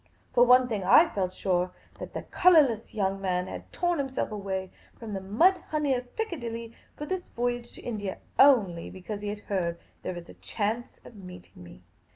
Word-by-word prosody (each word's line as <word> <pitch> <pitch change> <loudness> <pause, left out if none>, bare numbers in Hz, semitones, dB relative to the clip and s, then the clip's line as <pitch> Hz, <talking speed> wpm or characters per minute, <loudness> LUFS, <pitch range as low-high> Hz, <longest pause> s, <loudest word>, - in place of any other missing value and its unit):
For 245 - +4
of 245 - +6
one 250 0 +7
thing 215 -5 -2
I 315 - +6
felt 185 -2 -1
sure, 180 -1 0 0.3
that - - -8
the - - -3
colourless 285 -13 +4
young 195 -2 0
man 180 -1 0
had - - -8
torn 350 -2 0
himself 265 -4 -2
away 190 -2 -4 0.3
from 225 -3 -7
the 195 - -3
mud 280 - +4
honey 300 -3 +1
of 245 -1 -5
Piccadilly 235 - -4 0.2
for 295 - -6
this 370 +3 -4
voyage 240 0 -3
to - - -12
India 205 -5 -4 0.2
only 210 -12 +5
because 200 +3 -7
he 210 - -4
had 205 0 -4
heard 175 -5 -2 0.2
there 185 - -4
was 175 0 -9
a - - -12
chance 225 +3 -3
of - - -12
meeting 180 - -12
me. 85 -9 -14
215 Hz, 190 wpm, -28 LUFS, 190-255 Hz, 0.3 s, one